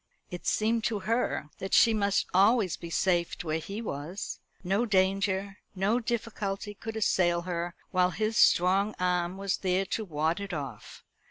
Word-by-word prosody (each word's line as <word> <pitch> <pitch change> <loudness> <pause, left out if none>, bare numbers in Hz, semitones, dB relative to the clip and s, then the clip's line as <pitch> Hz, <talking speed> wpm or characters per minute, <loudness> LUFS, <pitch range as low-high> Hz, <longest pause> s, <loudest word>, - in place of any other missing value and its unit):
It 180 - -6
seemed 225 +1 +1
to 210 -3 -1
her 215 -7 -1
that 190 - 0
she 230 - +6
must 200 -2 +1
always 200 0 +4
be 170 - -9
safe 175 0 +1
where 160 -1 -1
he 200 +8 -6
was. 165 +2 -5 0.2
No 195 +5 +1
danger, 195 0 +1 0.2
no 200 +6 +1
difficulty 215 -3 -3
could 220 +2 -7
assail 175 -5 +2
her 175 -1 -3 0.2
while 180 -1 +3
his 215 +4 -2
strong 195 +4 +4
arm 180 0 0
was 195 -1 -1
there 185 0 0
to 220 +3 -2
ward 160 -2 -1
it 200 -2 -5
off. 135 -7 -7
195 Hz, 160 wpm, -29 LUFS, 175-210 Hz, 0.2 s, she